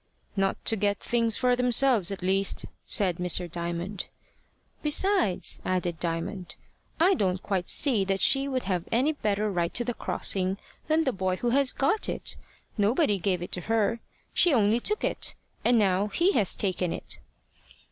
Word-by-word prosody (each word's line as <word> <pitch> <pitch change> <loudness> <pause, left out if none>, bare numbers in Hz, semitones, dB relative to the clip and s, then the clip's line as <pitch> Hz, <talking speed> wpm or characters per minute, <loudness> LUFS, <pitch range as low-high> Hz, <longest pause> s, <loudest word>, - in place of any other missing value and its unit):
"Not 195 -1 0
to 225 - +4
get 205 -1 0
things 230 -2 +1
for 250 -1 +2
themselves, 245 -5 +3
at 195 -2 -5
least," 195 +1 0 0.2
said 185 -4 +1
Mr. 180 -1 0
Raymond. 175 +3 -4 0.7
"Besides," 310 - +2
added 180 -2 -2
Diamond, 170 +2 -3 0.4
"I 360 +4 +5
don't 190 - -1
quite 190 -3 -2
see 255 -9 +2
that 195 0 -1
she 275 +5 +3
would 260 -2 -2
have 180 -3 -2
any 255 +7 +2
better 210 -5 -1
right 170 -2 -1
to 240 - +1
the 245 - -2
crossing 190 -3 -1 0.3
than 315 +1 +2
the 265 - 0
boy 185 -1 -1
who 240 +5 -1
has 275 0 +3
got 345 +10 0
it. - - -2 0.4
Nobody 210 - +2
gave 180 -2 -1
it - - -8
to 180 - -2
her; 225 +3 0 0.3
she 350 - +4
only 225 -3 +3
took 425 - 0
it. - - -2 0.3
And 240 - +4
now 195 -1 +2
he 345 - +2
has 205 - +1
taken 185 -3 -1
it." - - -6
205 Hz, 165 wpm, -27 LUFS, 185-250 Hz, 0.7 s, I